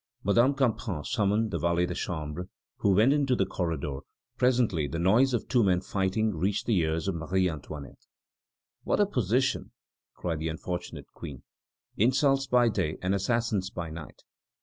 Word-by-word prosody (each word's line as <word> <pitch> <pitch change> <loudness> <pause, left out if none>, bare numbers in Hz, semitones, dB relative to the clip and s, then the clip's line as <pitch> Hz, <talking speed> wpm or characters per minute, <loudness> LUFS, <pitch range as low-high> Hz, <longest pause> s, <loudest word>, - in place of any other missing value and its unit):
Madame 120 +7 +3
Campan 110 - -1
summoned 110 -2 +1
the - - -2
valet 85 +1 +2
de - - -4
chambre, 80 +1 -4 0.3
who 100 -2 +2
went 115 +8 +5
into 140 -3 +2
the - - +1
corridor; 80 -6 -3 0.4
presently 120 - +2
the 70 - -4
noise 110 +10 +4
of 120 -4 -1
two 125 -3 +3
men 90 -3 +3
fighting 95 +3 -1
reached 95 +6 -1
the 115 - +2
ears 80 +1 -1
of 95 - +1
Marie 90 +3 0
Antoinette. 75 -4 -8 0.8
"What - - 0
a 205 - +5
position!" 130 - 0 0.4
cried 85 -3 -3
the 80 - -2
unfortunate 85 -2 -5
Queen. 70 -4 -9 0.5
"Insults 135 +4 +3
by 125 -1 +4
day 90 -8 -1
and 95 +1 +1
assassins 105 -1 0
by 85 -5 -6
night!" 80 -1 -10
95 Hz, 160 wpm, -28 LUFS, 85-120 Hz, 0.8 s, went